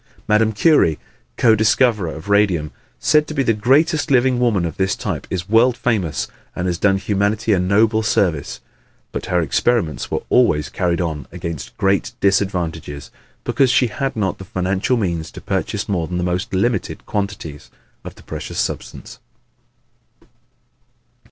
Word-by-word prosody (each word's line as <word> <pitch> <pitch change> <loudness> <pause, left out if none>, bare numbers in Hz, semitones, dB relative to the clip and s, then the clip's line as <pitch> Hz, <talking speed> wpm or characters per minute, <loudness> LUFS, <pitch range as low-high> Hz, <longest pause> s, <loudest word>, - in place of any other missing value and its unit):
Madame 110 +1 +3
Curie, 110 - +3 0.4
co 115 -2 +5
discoverer 110 -3 +2
of 80 +4 -10
radium, 100 -7 +2 0.3
said 150 +1 +3
to 155 - -6
be 135 - +2
the 115 - +2
greatest 145 +7 +2
living 130 -1 +3
woman 110 -8 +2
of 80 - -5
this 95 0 +1
type, - - -4
is 90 -1 -3
world 115 +3 +4
famous 105 -10 -1 0.3
and 90 - -3
has 90 -1 -1
done 100 -1 +3
humanity 105 +3 0
a 95 - +2
noble 105 +4 +3
service. 110 - 0 0.5
But - - -5
her 90 -1 +1
experiments 80 - 0
were - - -2
always 75 - +3
carried 85 +5 -1
on 80 -5 -3
against 85 -4 -6
great 95 0 +1
disadvantages 85 -8 -1 0.3
because 135 -2 +2
she 125 0 +3
had 135 +4 -3
not 95 -5 -1
the - - -7
financial 95 +6 -1
means 85 -6 -2
to - - -8
purchase 105 +1 -2
more 85 -5 -1
than 90 +1 -3
the 90 - -1
most 90 +1 -2
limited 115 +6 -1
quantities 100 -8 -4 0.3
of - - -9
the - - -17
precious - - -7
substance. - - -4
100 Hz, 155 wpm, -19 LUFS, 85-115 Hz, 0.5 s, co